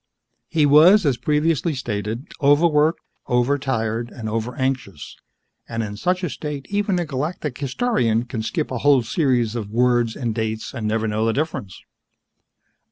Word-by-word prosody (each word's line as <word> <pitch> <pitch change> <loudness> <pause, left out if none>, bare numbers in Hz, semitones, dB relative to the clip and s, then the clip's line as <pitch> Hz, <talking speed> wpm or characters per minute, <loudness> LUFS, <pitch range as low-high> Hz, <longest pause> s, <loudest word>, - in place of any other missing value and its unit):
He 155 -2 +2
was, 165 +7 +6
as 135 -4 +2
previously 150 +4 0
stated, 110 +1 -4 0.2
overworked, 150 +2 +3 0.3
over 125 +4 +2
tired, 115 -3 -2
and 115 -3 -7
over 115 +3 -3
anxious 130 - -3 0.5
and, 115 0 -2
in 105 -1 -5
such 180 - -1
a 180 - 0
state, 145 -3 -5
even 205 -2 +1
a 175 - -1
Galactic 150 -1 -3
Historian 130 - 0
can 120 -2 -4
skip 115 +3 -3
a 125 - -2
whole 140 -1 +4
series 125 - +1
of 110 -4 -4
words 120 0 +2
and 120 -3 -2
dates 110 -1 -3
and 115 -5 -3
never 110 +1 0
know 110 +1 -1
the 115 - +1
difference. 135 - -4
125 Hz, 160 wpm, -22 LUFS, 115-150 Hz, 0.5 s, was